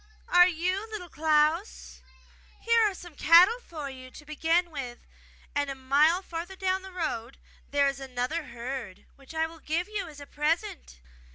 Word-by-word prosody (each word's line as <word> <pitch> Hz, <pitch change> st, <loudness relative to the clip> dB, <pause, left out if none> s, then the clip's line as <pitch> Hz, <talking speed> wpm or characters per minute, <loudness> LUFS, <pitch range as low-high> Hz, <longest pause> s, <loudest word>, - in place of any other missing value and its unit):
''Are 355 Hz, 0 st, +7 dB
you 365 Hz, +6 st, -2 dB
Little 400 Hz, -5 st, -7 dB
Klaus? 315 Hz, +5 st, +1 dB, 0.6 s
Here 465 Hz, 0 st, +3 dB
are 390 Hz, -, -8 dB
some 350 Hz, -2 st, -11 dB
cattle 355 Hz, +10 st, +6 dB
for 315 Hz, -, -7 dB
you 260 Hz, -1 st, -9 dB
to 295 Hz, -, -13 dB
begin 330 Hz, +3 st, +1 dB
with, 255 Hz, -5 st, -7 dB, 0.5 s
and 285 Hz, 0 st, 0 dB
a 275 Hz, -, -4 dB
mile 290 Hz, +7 st, +3 dB
farther 345 Hz, +2 st, -6 dB
down 375 Hz, 0 st, 0 dB
the 380 Hz, 0 st, -10 dB
road 290 Hz, -9 st, -4 dB, 0.3 s
there 285 Hz, -1 st, +3 dB
is 275 Hz, -1 st, -2 dB
another 265 Hz, +4 st, -3 dB
herd, 235 Hz, -5 st, -7 dB
which 275 Hz, +3 st, -14 dB
I 320 Hz, 0 st, +2 dB
will 325 Hz, 0 st, -10 dB
give 330 Hz, +3 st, -2 dB
you 420 Hz, -4 st, -4 dB
as 300 Hz, -3 st, -11 dB
a 285 Hz, -, -9 dB
present! 325 Hz, -, -2 dB
320 Hz, 170 wpm, -28 LUFS, 275-360 Hz, 0.6 s, Are